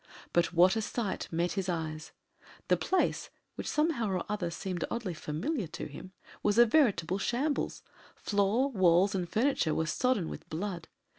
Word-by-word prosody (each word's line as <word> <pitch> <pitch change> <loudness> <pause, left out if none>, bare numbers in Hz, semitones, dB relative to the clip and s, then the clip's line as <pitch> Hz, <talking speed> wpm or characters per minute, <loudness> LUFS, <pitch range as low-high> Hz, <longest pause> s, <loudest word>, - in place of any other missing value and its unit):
But 175 -1 +3
what 180 +3 +5
a 220 - 0
sight 215 -1 -3
met 170 +2 0
his 195 -2 -2
eyes! 160 -2 -3 0.6
The - - +6
place, 375 - 0 0.2
which - - -6
somehow 300 -8 +1
or 190 - 0
the - - -4
other 190 -5 -2
seemed 175 0 -4
oddly 230 -6 -3
familiar 170 - -3
to - - -6
him, 155 +5 -9 0.3
was 205 +1 +1
a 240 - +8
veritable 210 - +2
shambles 275 +8 -1 0.3
floor, 210 +7 +1
walls, 185 -2 +4
and 180 -3 -2
furniture 225 - +1
were 160 - 0
sodden 205 +2 +1
with - - -8
blood. 175 +1 -4
190 Hz, 165 wpm, -30 LUFS, 170-235 Hz, 0.6 s, a